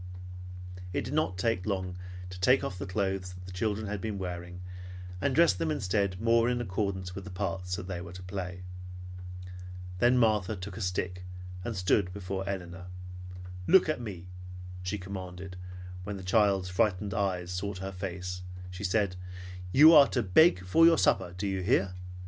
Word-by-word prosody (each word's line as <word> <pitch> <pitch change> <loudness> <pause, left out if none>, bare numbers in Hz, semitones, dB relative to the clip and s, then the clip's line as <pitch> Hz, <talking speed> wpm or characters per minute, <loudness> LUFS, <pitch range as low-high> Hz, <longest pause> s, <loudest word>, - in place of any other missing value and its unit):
It - - +1
did 125 - -4
not 150 -12 +1
take 95 -1 0
long 95 -3 -1 0.4
to 90 - -8
take 125 +8 +5
off 90 - -3
the 100 - -4
clothes 95 -1 -1
the 90 - -8
children 105 +3 -1
had 105 -1 -3
been 110 -2 -2
wearing, 90 -1 -5 0.6
and 135 +2 +1
dress 170 - +6
them 85 -3 -1
instead 95 +3 0
more 115 +2 +4
in 125 -1 +1
accordance 95 -4 -2
with 95 +1 -6
the 100 - -8
parts 90 -1 -2
they 90 -2 -4
were 85 -1 -8
to 90 0 -8
play. 90 -1 -5 1.4
Then 120 +4 +5
Martha 110 -3 +3
took 95 +1 -6
a 110 - -6
stick 90 -1 -2 0.4
and 115 +2 -3
stood 90 0 +2
before 95 0 -3
Elinor. 90 -1 -5 0.8
"Look 190 - +7
at 155 -5 0
me!" 95 -7 -6 0.6
she 95 +3 -2
commanded, 95 -1 -6
and 90 - -10 0.4
when 100 +1 -4
the 95 - -8
child's 95 -1 +3
frightened 100 +1 +1
eyes 90 -3 0
sought 95 +2 -2
her 95 +1 -4
face 90 -1 -4 0.3
she 90 +2 -7
said, 100 -1 +2 0.6
"You 155 - +9
are 145 -3 +10
to 125 - 0
beg 95 - +5
for 95 - +5
your 165 0 +8
supper, 90 0 +2
do 100 - -2
you 95 -1 0
hear? 95 0 +2
95 Hz, 170 wpm, -30 LUFS, 90-105 Hz, 1.4 s, are